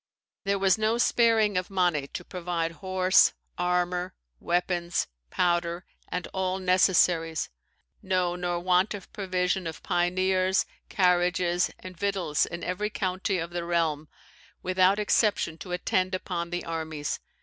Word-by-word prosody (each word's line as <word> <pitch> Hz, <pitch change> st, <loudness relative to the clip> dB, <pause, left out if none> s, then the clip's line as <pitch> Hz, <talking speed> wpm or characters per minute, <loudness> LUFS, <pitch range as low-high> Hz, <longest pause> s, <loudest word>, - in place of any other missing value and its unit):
There 200 Hz, 0 st, +1 dB
was 195 Hz, +2 st, +3 dB
no 220 Hz, +2 st, +2 dB
sparing 225 Hz, -5 st, +3 dB
of 180 Hz, -, -7 dB
money 175 Hz, -7 st, +1 dB
to 180 Hz, -, -7 dB
provide 175 Hz, -2 st, -3 dB
horse, 185 Hz, -1 st, +4 dB, 0.2 s
armour, 180 Hz, 0 st, -1 dB, 0.2 s
weapons, 175 Hz, 0 st, 0 dB, 0.2 s
powder, 175 Hz, -, 0 dB, 0.2 s
and 180 Hz, -, -3 dB
all 190 Hz, 0 st, -1 dB
necessaries; 180 Hz, -3 st, +2 dB, 0.5 s
no, 185 Hz, -2 st, 0 dB
nor 175 Hz, -1 st, -2 dB
want 185 Hz, +3 st, +2 dB
of 195 Hz, -, -11 dB
provision 185 Hz, -2 st, -1 dB
of 160 Hz, -, -7 dB
pioneers, 185 Hz, +1 st, +1 dB, 0.2 s
carriages, 180 Hz, -1 st, +2 dB
and 185 Hz, 0 st, -10 dB
victuals, 180 Hz, -5 st, 0 dB
in 170 Hz, 0 st, -6 dB
every 200 Hz, +4 st, -2 dB
county 190 Hz, -1 st, -1 dB
of 170 Hz, 0 st, -4 dB
the 175 Hz, 0 st, -3 dB
realm, 165 Hz, -3 st, 0 dB, 0.6 s
without 185 Hz, +1 st, +3 dB
exception, 205 Hz, -5 st, +1 dB
to 180 Hz, -, -8 dB
attend 185 Hz, +1 st, 0 dB
upon 175 Hz, -2 st, -4 dB
the 175 Hz, 0 st, -4 dB
armies. 160 Hz, -2 st, -3 dB
180 Hz, 130 wpm, -27 LUFS, 175-190 Hz, 0.6 s, horse